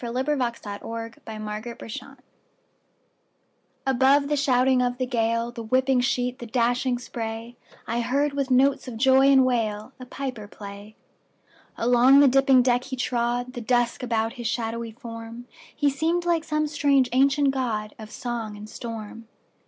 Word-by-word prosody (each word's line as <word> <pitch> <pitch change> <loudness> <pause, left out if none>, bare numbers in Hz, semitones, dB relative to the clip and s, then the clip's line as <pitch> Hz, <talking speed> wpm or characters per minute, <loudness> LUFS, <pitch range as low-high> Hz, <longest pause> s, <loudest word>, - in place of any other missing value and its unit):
Clinton 260 +5 -1 0.2
Scollard 225 +2 -7
Bag 215 -1 -7 0.3
Pipes - - -25
at - - -9
Sea 270 +1 -15 1.7
ABOVE 270 +2 +3
the 295 - +2
shouting 260 -2 +3
of 245 0 0
the 255 - -1
gale, 230 -1 0
The 235 -1 -7
whipping 255 +3 +2
sheet, 245 0 -1
the 240 - -7
dashing 245 +2 +1
spray,I 230 0 -6
heard, 280 +5 0
with 275 -1 -2
notes 270 +2 +3
of 240 -3 -6
joy 265 +2 +5
and 270 -2 +6
wail,A 235 +1 -2
piper 250 -6 -6
play. 205 +1 -11 0.8
Along 245 +3 +5
the 285 - +7
dipping 270 -1 +5
deck 245 0 +1
he 265 - -5
trod, 245 0 -1
The 240 - -6
dusk 240 0 +1
about 225 -2 -1
his 240 -3 -5
shadowy 230 0 -3
form; 230 -1 -9 0.3
He 290 -1 +2
seemed 330 +5 0
like 335 -2 +1
some 305 -1 0
strange 285 -3 +2
ancient 275 +2 +3
godOf 215 -4 -3
song 235 -4 -5
and 210 +1 -9
storm. 225 0 -8
245 Hz, 150 wpm, -25 LUFS, 230-270 Hz, 1.7 s, the